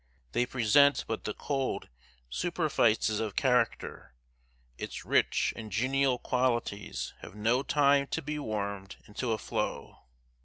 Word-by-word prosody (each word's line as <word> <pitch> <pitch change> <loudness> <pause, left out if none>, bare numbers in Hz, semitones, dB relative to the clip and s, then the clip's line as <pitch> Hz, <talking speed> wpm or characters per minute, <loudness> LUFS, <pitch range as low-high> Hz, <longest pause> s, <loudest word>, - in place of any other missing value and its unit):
They 125 - +1
present 130 +4 +4
but 110 - -4
the 105 - -2
cold 135 -2 -2 0.4
superfices 115 - +1
of 110 -3 -3
character 125 - 0 0.6
its - - -6
rich - - +2
and 110 -1 -8
genial 130 +4 +2
qualities 120 - -1
have 90 - -11
no 115 +5 +2
time 140 -1 +3
to - - -2
be 150 +1 -3
warmed 100 -5 -4
into 115 +3 -3
a 110 - +1
flow. - - -4
120 Hz, 125 wpm, -30 LUFS, 105-140 Hz, 0.6 s, present